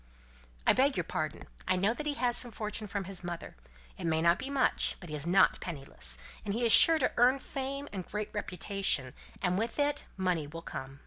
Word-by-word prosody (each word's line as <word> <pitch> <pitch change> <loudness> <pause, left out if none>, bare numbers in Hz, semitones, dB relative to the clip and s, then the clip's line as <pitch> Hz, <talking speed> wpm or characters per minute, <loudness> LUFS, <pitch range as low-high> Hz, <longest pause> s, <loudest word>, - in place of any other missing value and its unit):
"I - - +6
beg 270 +2 +2
your 180 - 0
pardon. 155 -2 -4 0.2
I 185 - +3
know 195 +5 +2
that 300 +4 -5
he 290 - -1
has 245 -3 0
some 245 - +2
fortune 215 -1 -4
from 200 0 -3
his 190 -1 -6
mother; 175 -1 -6 0.4
it - - -5
may 160 -1 +1
not 170 +2 +3
be 265 - -5
much, 275 -2 +1
but 175 - -11
he - - -3
is 150 +2 -5
not 190 +3 +4
penniless; 135 - -3 0.3
and 200 0 -3
he 240 +1 0
is 230 - +4
sure 325 +7 +10
to 265 - +1
earn 250 +3 +5
fame 275 +1 -5
and 190 -2 -4
great 210 +3 -5
reputation, 195 -8 -1 0.3
and 180 0 +1
with 230 +1 -3
it 290 0 0
money 180 -5 0
will 165 +3 -9
come," - - -5
said - - -14
Cynthia. 135 +1 -16
195 Hz, 230 wpm, -31 LUFS, 170-245 Hz, 0.4 s, sure